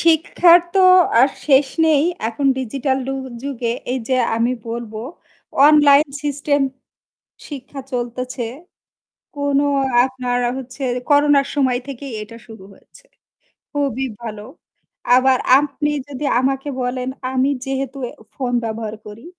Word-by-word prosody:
শিক্ষার 335 +1 +5 0.2
তো 385 - +4 0.4
আর 265 - +6 0.2
শেষ 275 -1 +5 0.2
নেই। 300 -2 +4 0.3
এখন 275 +5 -2
ডিজিটাল 265 +2 -1
ডু 270 - -2 0.3
যুগে 250 -4 -3 0.2
এই 260 - -1
যে 260 - +2 0.2
আমি 235 +2 +1 0.2
বলবো 230 -2 -5 0.7
অনলাইন 295 0 +6 0.2
সিস্টেম 290 0 0 0.9
শিক্ষা 275 -1 -8
চলতেছে। 245 0 -4 0.9
কোনো 285 0 +1 0.4
আপনার 250 -2 -2 0.2
হচ্ছে 265 +1 -9 0.3
করোনার 290 -1 +4
সময় 260 -3 +1
থেকেই 275 -1 -7
এটা 210 +2 -11
শুরু 220 -4 -12
হয়েছে, - - -21 0.7
খুবই 275 -3 -1 0.2
ভালো। 215 -3 -7 0.7
আবার 255 0 +4 0.2
আপনি 295 +1 -2 0.2
যদি 285 +1 -5
আমাকে 270 +2 -1
বলেন 250 +1 -3 0.2
আমি 265 +1 +1 0.2
যেহেতু 270 0 -3
এ - - -11 0.2
ফোন 255 -3 -3
ব্যবহার 220 -1 -4
করি। 210 +6 -11
265 Hz, 120 wpm, -19 LUFS, 245-285 Hz, 0.9 s, আর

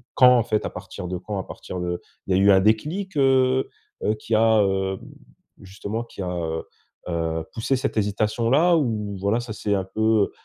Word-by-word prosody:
quand 125 -1 +7
en - - +4
fait, 110 -2 -1
à - - -2
partir 90 - -7
de 90 - -2
quand? 100 +2 -5
À 95 - -3
partir 90 - -8
de 90 0 -2 0.3
il 95 - +2
y - - +3
a 95 - +3
eu 100 - +6
un 95 -1 +6
déclic, 150 - 0
heu, 130 -1 +3 0.4
heu, 105 - +2
qui 110 +1 -2
a, 110 -1 +5
heu, 95 -1 0 0.6
justement 100 +4 -5
qui 100 - -9
a, 90 - -3
heu, 80 -2 -3 0.5
heu, 80 -1 -1
poussé 115 +4 0
cette 125 - -3
hésitation-là? 115 - +2
Ou 105 -8 -1
voilà 100 +4 +1
ça 120 - -8
c'est 105 -1 -2
un 95 - 0
peu, 110 0 +1
105 Hz, 200 wpm, -23 LUFS, 95-120 Hz, 0.6 s, quand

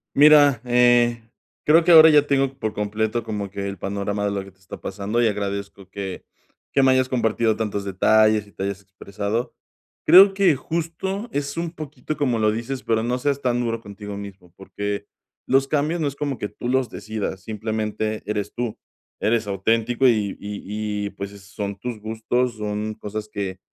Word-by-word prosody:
Mira, 145 -3 +7
eh, 120 -1 +4 0.4
creo 160 +2 +5
que 175 - +5
ahora 160 0 +10
ya 145 -1 +5
tengo 135 -1 +1
por 110 -1 -2
completo 110 +2 -1
como 105 -3 -4
que 100 0 -5
el 100 - -7
panorama 100 +2 -2
de 100 - 0
lo 100 -1 -3
que 95 - -13
te 95 - -34
está 95 - -11
pasando 100 +4 -2
y 120 - +4
agradezco 100 -2 -4
que 95 -2 -6 0.5
que 135 - +4
me 130 - +5
hayas 130 0 +2
compartido 115 -2 +1
tantos 105 -2 -2
detalles 110 +2 +3
y - - -20
te - - -5
hayas 100 0 -3
expresado. 100 +4 -4 0.5
Creo 190 +4 +8
que 195 -5 +4
justo 170 - -3
es 140 +1 -3
un 170 0 -2
poquito 155 -2 -6
como 130 -6 0
lo 110 0 +3
dices, 120 +4 -4
pero 110 -1 +1
no 125 +2 0
seas 140 +2 -1
tan 120 -2 +1
duro 115 -1 -2
contigo 100 -1 -8
mismo, 95 -4 -10
porque 100 +1 -5 0.4
los 135 +1 +3
cambios 155 +4 0
no 155 - 0
es 140 - -4
como 140 -3 -3
que 105 - -3
tú 115 +4 -6
los 130 -1 +1
decidas, 110 -3 -5
simplemente 110 +1 -3
eres 105 0 -3
tú. 120 -3 -3 0.4
Eres 110 0 +1
auténtico 115 +6 +1
y 105 -5 +1
y 105 0 -4
y, - - -4
pues, 100 0 -7
eh, 100 - -12
son 100 +1 -6
tus 120 +1 -5
gustos, 115 +2 -1
son 105 0 -3
cosas 105 +1 -6
que 95 -2 -4
110 Hz, 185 wpm, -23 LUFS, 100-130 Hz, 0.5 s, ahora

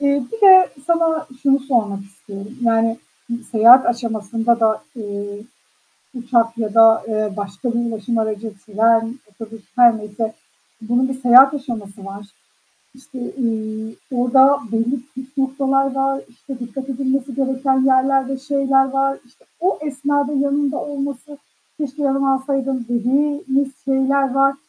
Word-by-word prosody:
Eee, 280 -1 +1
bir 450 -3 +3
de 375 -1 +8 0.2
sana 330 -1 +1 0.2
şunu 275 -1 +3
sormak 220 -7 -1
istiyorum. 200 +1 -11
Yani, 230 -1 +1 0.5
seyahat 235 +3 +7
aşamasında 230 0 -1
da, 220 -1 +1
eee, 205 -1 -7 0.7
uçak 235 -2 0
ya 215 -2 -3
da, 225 -1 +6
eee, 215 -1 -2
başka 200 +4 -4
bir 235 - -1
ulaşım 225 +2 -3
aracı, 220 0 -3
tren, 225 +3 +1
otobüs, 220 +1 -11
her 240 -2 +5
neyse, 215 +1 -5 0.5
bunun 240 +4 0
bir 265 0 -6
seyahat 255 +3 +7
aşaması 215 -8 -7
var. 200 +1 -9 0.7
İşte, 260 0 -12 0.2
ııı, 220 -2 -3 0.3
orada 265 +3 +4
belli 230 +4 -1 0.2
püf 265 +2 -11
noktalar 270 0 0
var. 270 0 -1
İşte, 250 +2 -11
dikkat 260 +3 -7
edilmesi 265 0 -2
gereken 265 0 0
yerler 265 0 +2
ve 270 - -3
şeyler 275 -1 +1
var. 275 0 0
İşte, 245 - -28
o 365 +3 0
esnada 285 0 -1
yanında 285 0 0
olması, 285 0 -6 0.4
"Keşke 295 -1 -5
yanıma 275 0 +1
alsaydım." 265 -2 -3
dediğimiz 275 - 0
şeyler 270 0 +1
var. 275 0 +3
260 Hz, 135 wpm, -19 LUFS, 225-275 Hz, 0.7 s, de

